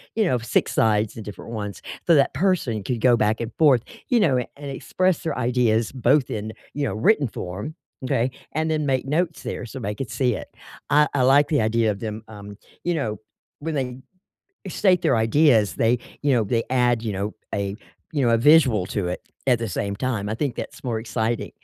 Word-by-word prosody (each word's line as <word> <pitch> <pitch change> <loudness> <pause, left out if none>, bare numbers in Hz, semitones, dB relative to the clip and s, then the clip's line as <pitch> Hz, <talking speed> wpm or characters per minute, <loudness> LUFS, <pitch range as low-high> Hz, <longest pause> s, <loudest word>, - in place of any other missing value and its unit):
you 220 - +3
know, 150 -11 +1
6 115 - 0
sides, 105 -1 +2
the 115 - -8
different 105 +2 -9
ones, 105 -3 -5 0.2
so 170 - +6
that 140 - +3
person 140 - 0
could 120 +4 -2
go 120 +1 +5
back 110 -1 +1
and 115 0 -4
forth, 135 -7 +5 0.2
you 245 - +3
know, 150 - +3
and 140 +3 -7
express 185 +5 0
their 160 -3 -3
ideas 120 -3 +1
both 130 +1 +2
in, 110 0 -4 0.2
you 145 - -2
know, 140 - -1
written 145 - +3
form, 100 - -6 0.3
okay? 125 0 0 0.2
And 160 +1 0
then 155 -2 0
make 130 -1 +1
notes 160 +4 -1
there 125 - -5
so 130 - -8
they 105 -3 -3
could 120 +2 -5
see 125 +2 +1
it. - - -6 0.4
I 150 0 +5
I 140 - +1
like 135 +3 +5
the 150 -6 +2
idea 110 0 +2
of 100 - -6
them, 110 0 -5
um, 100 -2 -10 0.3
you 175 0 0
know, 110 -9 -2 0.4
when 160 +1 -3
they 125 -3 -2 0.7
state 180 -1 +3
their 130 - +3
ideas, 110 - +3
they, 120 +2 +2 0.2
you 145 -1 +2
know, 120 -4 +3
they 115 +3 0
add, 120 -2 +2
you 110 -3 -2
know, 100 +2 -3 0.2
a 100 0 -2 0.4
you 145 -4 +1
know, 120 - +3
a - - +5
visual 130 - +5
to 95 -2 -2
it 90 - -6 0.2
at 125 -2 +4
the 115 -1 -3
same 100 +2 -3
time, 110 -4 -2
I 110 - -1
think 135 +1 -2
that's - - -7
more 115 -3 -1
exciting, 115 0 -2
120 Hz, 210 wpm, -23 LUFS, 110-145 Hz, 0.7 s, so